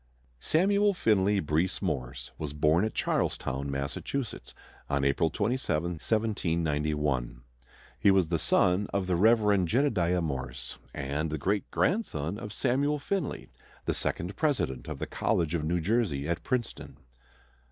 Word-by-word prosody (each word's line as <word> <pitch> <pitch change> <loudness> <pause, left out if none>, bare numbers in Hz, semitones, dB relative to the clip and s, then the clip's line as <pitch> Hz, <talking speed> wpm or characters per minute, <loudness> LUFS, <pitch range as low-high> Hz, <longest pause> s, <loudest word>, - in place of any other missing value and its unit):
Samuel 200 - +3
Finley 105 - +3
Breese 80 +2 0
Morse 60 0 -3
was 75 -2 -4
born 75 +4 +3
at 110 - -4
Charlestown, 65 +2 -1
Massachusetts, 70 - -4 0.3
on 70 -1 +1
April 70 +4 +2
27, 100 - -1
1791. 75 - 0 0.6
He - - +5
was 95 -4 +4
the 85 -2 +1
son 90 +5 +2
of 100 -1 0
the 90 -1 +1
Rev. 105 0 +4
Jedediah 90 - +2
Morse, 65 -4 -4 0.2
and 70 +4 -2
the 80 - -2
great 100 +7 -1
grandson 100 - 0
of 105 -3 -7
Samuel 140 +7 +1
Finley, 175 +2 -3 0.4
the - - +1
second 90 +4 -2
president 140 - 0
of - - -5
the - - -3
College 80 -1 0
of 80 -3 0
New 85 +3 0
Jersey 85 - 0
at 85 +1 -1
Princeton. 125 -3 -3
85 Hz, 135 wpm, -29 LUFS, 75-110 Hz, 0.6 s, He